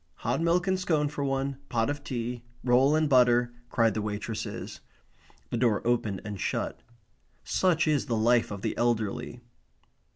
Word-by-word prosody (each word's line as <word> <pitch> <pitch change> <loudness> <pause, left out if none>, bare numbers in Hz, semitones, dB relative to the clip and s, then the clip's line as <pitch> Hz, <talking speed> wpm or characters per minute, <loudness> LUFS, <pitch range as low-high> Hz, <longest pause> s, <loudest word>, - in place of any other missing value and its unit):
"Hot 125 +6 +1
milk 170 +1 +2
and 190 -1 +1
scone 155 -5 +1
for 145 -1 -4
one. 135 0 -1
Pot 115 -1 +1
of 145 0 -3
tea. 120 -2 -4 0.2
Roll 130 +4 +4
and 155 0 +2
butter," 120 -2 +4 0.2
cried 115 -2 +2
the 110 - -2
waitresses. 105 +1 -5 0.7
The - - -1
door 115 -4 +1
opened 110 -5 0
and 105 -2 -5
shut. - - -2 0.6
Such 170 -3 +2
is 150 -3 +1
the 115 - 0
life 120 +1 +3
of 100 -1 -7
the - - -1
elderly. 120 0 -1
120 Hz, 160 wpm, -28 LUFS, 115-145 Hz, 0.7 s, Roll